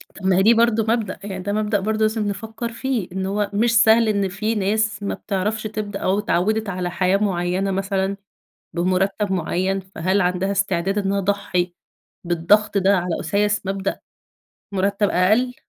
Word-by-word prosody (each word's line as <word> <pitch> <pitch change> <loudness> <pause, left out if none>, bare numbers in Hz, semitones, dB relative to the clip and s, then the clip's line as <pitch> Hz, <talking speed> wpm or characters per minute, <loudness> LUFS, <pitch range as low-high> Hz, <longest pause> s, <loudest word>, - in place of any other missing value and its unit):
طَب 190 - -9
ما 190 -1 +4
هي 190 - +4
دي 225 - +6
برضه 230 -1 +3
مبدأ، 225 -4 -1
يعني 190 -2 -5
ده 205 - -2
مبدأ 210 -1 0
برضه 215 +2 -1
لازم 215 -1 +1
نفكّر 225 +3 -5
فيه، 235 -4 -2
إن 190 0 -3
هو 205 +1 -1
مش 230 +2 +3
سهل 225 +1 +5
إن 200 -2 +1
في 215 +4 -2
ناس 210 +1 0
ما 200 - -1
بتعرفش 210 +2 -2
تبدأ 215 -2 -4
أو 190 +2 +1
اتعوّدت 210 +2 0
على 180 -2 -3
حياة 185 +2 +2
معيّنة 190 -1 0
مثلًا 195 0 -1 0.6
بمرتّب 190 +3 0
معيّن، 185 +2 0
فهل 190 +1 -1
عندها 180 +2 0
استعداد 195 -1 0
إن 205 - -1
أنا 200 +1 +1
اضحّي 185 -3 -1 0.5
بالضغط 185 +5 +2
ده 195 +1 +3
على 175 -2 -2
أُساس 205 +4 0
مبدأ 195 0 -2 0.7
مرتّب 200 +1 +1
أقل؟ 215 +8 +2
200 Hz, 170 wpm, -21 LUFS, 190-215 Hz, 0.7 s, دي